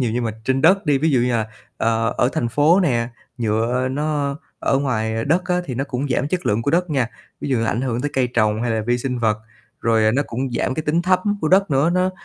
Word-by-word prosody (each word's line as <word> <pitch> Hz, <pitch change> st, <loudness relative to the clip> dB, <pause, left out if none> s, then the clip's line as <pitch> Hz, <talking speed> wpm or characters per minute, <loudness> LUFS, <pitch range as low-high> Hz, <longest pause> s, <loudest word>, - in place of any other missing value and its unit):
nhiều 120 Hz, -3 st, +1 dB
nhưng 120 Hz, -1 st, -1 dB
mà 110 Hz, -, -1 dB
trên 130 Hz, +1 st, 0 dB
đất 190 Hz, +3 st, +4 dB
đi, 145 Hz, -2 st, +3 dB
ví 160 Hz, +2 st, +1 dB
dụ 130 Hz, -, +3 dB
như 125 Hz, 0 st, +1 dB
là, 110 Hz, -2 st, 0 dB, 0.3 s
ờ, 115 Hz, -1 st, 0 dB
ở 120 Hz, -, +3 dB
thành 140 Hz, -7 st, -1 dB
phố 150 Hz, -, +4 dB
nè, 120 Hz, -8 st, +1 dB, 0.3 s
nhựa 115 Hz, +3 st, 0 dB
nó 145 Hz, 0 st, -1 dB, 0.2 s
ở 135 Hz, -, +1 dB
ngoài 115 Hz, -4 st, -1 dB
đất 175 Hz, +5 st, +1 dB
á 180 Hz, -1 st, 0 dB
thì 130 Hz, -, -5 dB
nó 135 Hz, -, -1 dB
cũng 140 Hz, 0 st, -3 dB
giảm 130 Hz, +3 st, 0 dB
chất 180 Hz, +1 st, -2 dB
lượng 105 Hz, +3 st, +1 dB
của 140 Hz, -, 0 dB
đất 175 Hz, +1 st, +1 dB
nha, 130 Hz, -5 st, +1 dB, 0.3 s
ví -, -, -4 dB
dụ 130 Hz, -4 st, +1 dB
là 115 Hz, -, 0 dB
ảnh 120 Hz, -, -1 dB
hưởng 125 Hz, -2 st, -1 dB
tới 145 Hz, -, -2 dB
cây 130 Hz, -2 st, +2 dB
trồng 110 Hz, -1 st, +2 dB
hay 120 Hz, -, -1 dB
là 110 Hz, -1 st, 0 dB
vi 120 Hz, +2 st, 0 dB
sinh 125 Hz, 0 st, -3 dB
vật. 110 Hz, -2 st, +1 dB, 0.4 s
Rồi 110 Hz, -1 st, +3 dB
nó 140 Hz, +4 st, +2 dB
cũng 130 Hz, +2 st, -3 dB
giảm 120 Hz, -, -1 dB
cái 155 Hz, -, -2 dB
tính 160 Hz, +3 st, +1 dB
thấm 185 Hz, +1 st, +3 dB, 0.2 s
của 155 Hz, -, 0 dB
đất 195 Hz, +1 st, +4 dB
nữa, 145 Hz, +4 st, +3 dB
nó, 185 Hz, +1 st, +1 dB
130 Hz, 265 wpm, -21 LUFS, 115-150 Hz, 0.4 s, đất